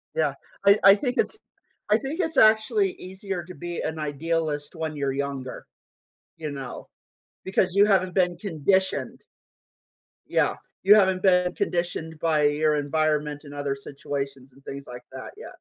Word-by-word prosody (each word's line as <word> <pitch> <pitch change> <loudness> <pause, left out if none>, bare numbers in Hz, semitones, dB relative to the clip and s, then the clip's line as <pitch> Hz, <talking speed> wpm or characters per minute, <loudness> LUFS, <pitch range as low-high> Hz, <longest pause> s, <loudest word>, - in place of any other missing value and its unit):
Yeah, 150 -3 +1 0.3
I 200 +1 +7
I 195 +1 +9
think 250 +4 -2
it's 425 - 0 0.5
I 210 - +5
think 275 - -5
it's 320 -4 -1
actually 220 - +4
easier 190 -1 -6
to 180 - -10
be 175 -1 -5
an 160 0 -3
idealist 150 +1 -2
when 160 -1 -4
you're 140 -2 -1
younger, 140 -2 -4 0.7
you 155 -2 -5
know, 135 -3 -7 0.6
because 190 -1 +1
you 200 +1 +6
haven't 185 -3 +2
been 180 -2 +2
conditioned. 190 +1 0 1.1
Yeah, - - +1 0.3
you 205 +2 +8
haven't 190 -3 +3
been 180 -2 +3
conditioned 170 -2 -2
by 155 -2 +2
your 150 +1 +3
environment 150 0 0
and 145 - -11
other 145 -1 -2
situations 135 -1 -6
and 135 +1 -21
things 140 0 -7
like 125 0 -9
that, 130 -1 -8
yeah. 455 - -9
160 Hz, 155 wpm, -25 LUFS, 145-190 Hz, 1.1 s, I